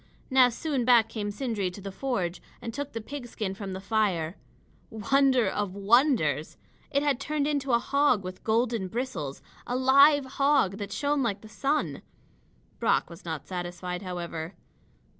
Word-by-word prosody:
Now 260 -1 +6
soon 270 +1 -2
back 235 -2 +5
came 215 -2 -3
Sindri 210 -3 -2
to 180 - -10
the 195 0 -6
forge 190 -6 -2 0.2
and 230 - -6
took 285 +2 -5
the 225 - -4
pigskin 235 -6 -5
from 195 -1 -6
the 190 - -5
fire. 195 -5 0 0.5
Wonder 260 +2 +3
of 195 -1 -2
wonders! 200 - +2 0.3
It 280 0 +1
had 285 -4 +1
turned 295 +1 -1
into 285 -3 0
a 235 - +5
hog 270 -3 +2
with 185 0 -8
golden 230 -2 +1
bristles; 185 - -4 0.2
a 245 - -1
live 275 +2 +6
hog 270 -7 +2
that 200 -1 -5
shone 290 +4 0
like 205 -5 -1
the 220 - -12
sun. 285 +6 -1 0.8
Brock - - +1
was 170 +2 -12
not 160 -3 -4
satisfied, 180 0 -5
however. 175 -2 -5
225 Hz, 160 wpm, -28 LUFS, 190-270 Hz, 0.8 s, Now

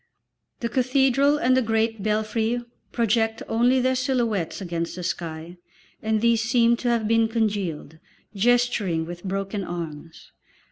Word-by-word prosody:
The 235 - -1
cathedral 270 +3 +3
and 255 -2 +3
the 260 - +3
great 225 -1 0
belfry 220 +3 0 0.3
project 225 -1 0
only 245 +3 +3
their 255 +1 +2
silhouettes 240 - -1
against 170 -3 -4
the 180 - -6
sky, 170 0 -5 0.4
and 220 0 0
these 235 -1 +3
seem 235 +1 +3
to 245 - -4
have 230 -2 +1
been 225 0 +3
congealed, 200 -9 -2 0.3
gesturing 210 -6 +1
with 175 +1 -8
broken 195 +1 -3
arms. 165 -2 -7
225 Hz, 135 wpm, -24 LUFS, 185-240 Hz, 0.4 s, cathedral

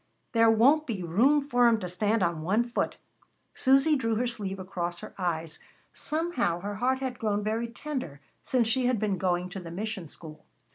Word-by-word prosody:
"There 230 -1 +5
won't 275 +8 +4
be 205 -7 -3
room 240 - +3
for 245 -3 +4
'em 230 -2 +3
to 180 - -3
stand 205 +4 0
on 170 -2 -1
one 200 +8 +2
foot." 240 0 -2 0.6
Susy 275 +4 +4
drew 230 -5 0
her 240 +3 0
sleeve 205 -5 -3
across 175 -2 -4
her - - -9
eyes. 165 -3 -2 0.3
Somehow 300 - -1
her 205 +2 -4
heart 260 +3 0
had 255 -2 -4
grown 210 -2 0
very 220 +2 -1
tender 235 - -6 0.2
since 245 -3 +1
she 245 +2 +1
had 250 -4 +1
been 200 -3 -1
going 180 -1 0
to 195 +1 -6
the 175 -2 -9
mission 195 0 -5
school. 155 0 -12
220 Hz, 190 wpm, -28 LUFS, 180-245 Hz, 0.6 s, There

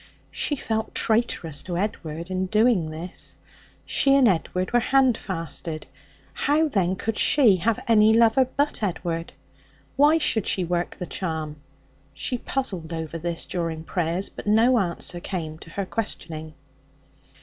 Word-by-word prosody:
She 295 - 0
felt 220 -4 -3
traitorous 215 -10 0
to 175 -2 -4
Edward 170 -3 -4
in 185 0 -1
doing 210 -5 +3
this. 165 +3 -5 0.5
She 275 0 +4
and 270 -3 +5
Edward 185 +1 0
were 240 - +5
handfasted. 195 - 0 0.5
How, 305 +3 +2
then, 190 -7 +1
could 225 +3 -3
she 235 -10 +5
have 215 +5 0
any 220 -1 +5
lover 230 +3 +5
but 285 -3 +1
Edward? 170 -4 -3 0.6
Why 295 +3 +5
should 225 -9 +1
she 185 - +2
work 175 0 -2
the 180 - -5
charm? 160 -5 -4 0.6
She 250 - -2
puzzled 190 -14 -3
over 165 0 -4
this 170 0 -4
during 165 -2 -3
prayers, 175 +2 -1
but - - -10
no 230 +4 +4
answer 175 -1 -2
came 160 -4 -5
to 165 - -12
her 195 +3 -3
questioning. 160 -7 -5
185 Hz, 140 wpm, -24 LUFS, 165-230 Hz, 0.6 s, and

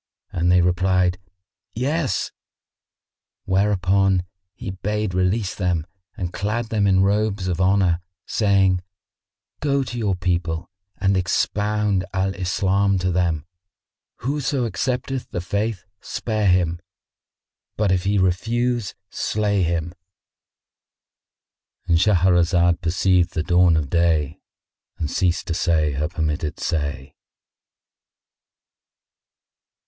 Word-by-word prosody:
and 85 0 +1
they 90 0 +5
replied, 90 +1 +2 0.6
"Yes"; 140 +4 -1 1.1
whereupon 95 -1 +2 0.3
he 95 - -6
bade 105 +1 -2
release 95 +3 0
them 90 -5 -1 0.3
and 90 -4 -4
clad 110 +3 -2
them 105 -3 +1
in 95 -1 +4
robes 100 -1 +1
of 90 0 -1
honour, 95 -2 +3 0.2
saying, 95 -4 +2 0.8
"Go 140 -2 +1
to 120 -2 -5
your 100 -4 0
people 85 -2 -2 0.3
and 100 0 +1
expound 105 +2 0
Al 95 +1 0
Islam 95 +1 +1
to 90 0 0
them. 85 -4 0 0.8
Whoso 135 0 -1
accepteth 130 +2 -2
the - - -3
Faith 100 +3 -2
spare 110 -3 -2
him; 90 -2 +2 1.0
but 105 -3 +2
if 90 -1 +1
he 100 +1 +2
refuse 115 +5 0 0.2
slay 105 -2 0
him."——And 85 -2 -7
Shahrazad 90 -2 +3
perceived 90 +1 +2
the 80 - 0
dawn 90 -1 +4
of 75 -4 -2
day 80 -3 +1 0.6
and 75 - -3
ceased 90 -2 0
to 85 - -2
say 80 -3 +1
her 75 +2 -1
permitted 80 -2 -2
say. 70 -3 -3
95 Hz, 105 wpm, -22 LUFS, 85-105 Hz, 1.1 s, they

